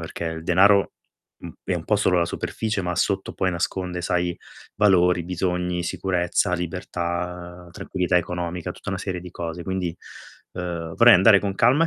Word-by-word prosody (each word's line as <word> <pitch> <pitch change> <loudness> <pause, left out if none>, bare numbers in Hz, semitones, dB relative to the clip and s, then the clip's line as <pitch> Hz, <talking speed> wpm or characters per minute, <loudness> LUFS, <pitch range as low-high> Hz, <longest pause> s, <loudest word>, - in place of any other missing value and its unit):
perché 80 +1 -6
il 80 -1 -4
denaro, 95 +3 +4 0.5
mhmm, - - -8
è - - -1
un - - -6
po' - - +3
solo 90 - +2
la 85 - +2
superficie, 110 +3 -3
ma 90 0 -2
sotto 95 +2 -1
poi 95 -1 0
nasconde, 90 0 -3
sai, 90 0 0 0.4
valori, 90 -4 +4
bisogni, 90 0 -1
sicurezza, 90 +1 0
libertà, 90 0 -4
tranquillità 90 +1 0
economica, 90 0 -4
tutta - - -7
una 95 - -3
serie 95 -3 -4
di 90 - -10
cose. 85 0 -5
Quindi, 90 -2 -3 0.6
uhm, 85 -2 -5
vorrei 120 -1 +8
andare 100 +3 +7
con 100 -1 -2
calma 125 +10 +4
e - - +2
90 Hz, 165 wpm, -23 LUFS, 85-95 Hz, 0.6 s, vorrei